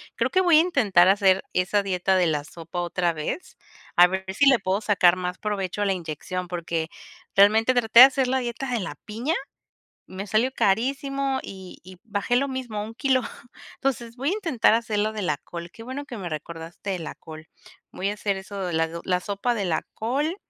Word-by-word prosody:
creo - - 0
que 375 - +2
voy 345 -4 +5
a - - +7
intentar 205 - +3
hacer 190 -1 +4
esa 185 +3 +1
dieta 190 -1 0
de 180 -2 +3
la 150 -2 0
sopa 165 +3 -7
otra 175 0 0
vez, 160 - -5 0.4
a 175 - +8
ver 190 +1 -2
si 280 - +4
le 265 -3 +6
puedo 195 +1 -1
sacar 190 -5 +4
más 180 0 -4
provecho 205 -2 -3
a - - +2
la 195 - +2
inyección, 180 +1 -5
porque 170 -2 -3 0.5
realmente 220 +5 +5
traté 235 -1 +6
de - - +14
hacer 270 -1 +1
la 260 +1 +1
dieta 245 +2 -4
de 245 -2 0
la 185 - -4
piña, 235 +9 -2 0.7
me 190 +2 -6
salió 220 +6 +1
carísimo 270 +5 0
y 190 -2 -10
y 185 +1 -13
bajé 210 +2 -1
lo 275 +3 +2
mismo, 250 -6 -4
un 225 +2 -9
kilo, 260 0 +2 0.5
entonces, 240 -4 -3
voy 270 +4 -1
a - - +1
intentar 330 - +2
hacer 225 -2 0
lo 215 +1 0
de 215 - -4
la 150 -6 0
col, 170 +2 -9
qué 225 - -12
bueno 260 +4 -6
que 245 - -8
me 185 -4 -5
recordaste 165 +4 -7
de 190 -2 -2
la 160 - -6
col, 160 -1 -12 0.4
voy 195 - -2
a 205 - -3
hacer 205 -1 -1
eso 200 +1 -8
de 175 - -3
la 160 0 +1
la 180 -1 +1
sopa 200 +6 -2
de 210 -4 -2
la 170 -3 0
col 280 +9 -1
205 Hz, 210 wpm, -24 LUFS, 180-245 Hz, 0.7 s, de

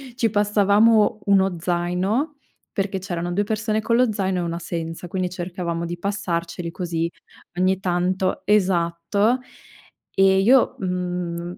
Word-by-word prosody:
ci 230 -2 +1
passavamo 210 +1 +3
1 195 -2 +3
zaino 180 - -1 0.4
perché 195 -1 -1
c'erano 175 -2 -4
2 205 +4 0
persone 215 +1 -1
con 230 +2 +1
lo 245 -1 +3
zaino 190 -3 -1
e - - 0
1 170 0 -3
senza, 165 0 -5
quindi 185 +1 -2
cercavamo 175 -1 -4
di 175 +1 -5
passarceli 170 -3 -3
così 165 -1 -2 0.5
ogni 185 +1 +2
tanto 185 0 0
esatto, 195 +3 +2 0.8
e 190 0 +5
io, 245 +6 +4
mhmm, 180 -2 -3
185 Hz, 130 wpm, -22 LUFS, 175-205 Hz, 0.8 s, e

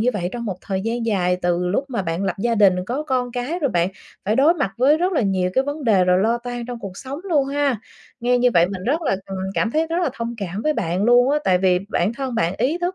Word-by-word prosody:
như 235 - +2
vậy 180 -4 -2
trong 240 -1 -5
một 195 -5 -3
thời 190 -1 -3
gian 230 +2 -2
dài 180 -4 +1
từ 175 0 +1
lúc 205 +10 0
mà 235 -7 -2
bạn 170 +2 -2
lập 190 - 0
gia 230 +3 +1
đình, 200 -4 +5
có 265 +5 -2
con 255 -4 -1
cái, 250 +8 -3
rồi 285 -6 0
bạn 175 0 +1 0.4
phải 215 +3 +1
đối 305 +6 +5
mặt 280 - -1
với 270 +5 +4
rất 365 +2 0
là 310 - +2
nhiều 190 -4 0
cái 265 - +2
vấn 285 +1 -4
đề 200 -6 +4
rồi 180 0 +3
lo 230 +4 +2
toan 245 0 -6
trong 245 -1 -6
cuộc 195 -5 -8
sống 275 +6 -7
luôn 300 -8 +1
ha. 275 -5 0 0.4
Nghe 245 +1 +2
như 250 0 +4
vậy 170 0 +5
mình 190 -2 -6
rất 300 +7 0
là 195 -11 +1
ừm, 195 - -5 0.2
cảm 230 - +1
thấy 315 +5 +1
rất 335 +2 -1
là 340 - +2
thông 235 -2 -4
cảm 195 +1 -4
với 305 - +2
bạn 185 - -1
luôn 245 +2 +5
á, 295 - +2
tại 185 -1 +3
vì 180 -1 +3
bản 205 0 0
thân 265 -1 -4
bạn 175 -4 0
ý 275 +9 +1
thức 355 +1 -2
235 Hz, 285 wpm, -21 LUFS, 190-275 Hz, 0.4 s, đình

